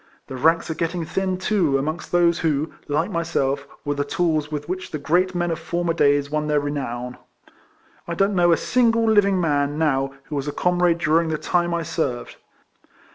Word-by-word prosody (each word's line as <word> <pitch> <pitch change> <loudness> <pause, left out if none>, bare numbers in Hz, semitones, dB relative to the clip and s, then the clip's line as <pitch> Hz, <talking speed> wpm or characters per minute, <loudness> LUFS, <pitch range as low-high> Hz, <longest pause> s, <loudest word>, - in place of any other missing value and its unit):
The 130 - -8
ranks 165 +6 +2
are - - 0
getting 165 +1 -2
thin, 190 +2 -1
too, 185 -7 +1
amongst 155 +5 -4
those 170 -1 +3
who, 155 -1 -1
like 155 +7 0
myself, 140 -5 -1 0.2
were 145 - 0
the 145 0 -1
tools 155 0 -1
with 150 -1 -4
which 185 +1 -4
the 155 - -4
great 175 +6 +1
men 175 -1 0
of 165 - -3
former 170 0 -1
days 145 -2 +2
won 150 0 -1
their 150 -1 +2
renown. 125 -4 -4 0.9
I 170 - -3
don't 195 +3 +2
know 175 -2 +4
a 165 - +4
single 230 -2 +2
living 200 -3 +4
man 145 -3 0
now 135 -3 0
who 150 - -7
was 140 0 -3
a 145 - -3
comrade 175 -1 +2
during 165 0 +2
the 155 - -1
time 175 +2 0
I 170 -1 -1
served. 135 -7 -3
160 Hz, 190 wpm, -22 LUFS, 145-175 Hz, 0.9 s, know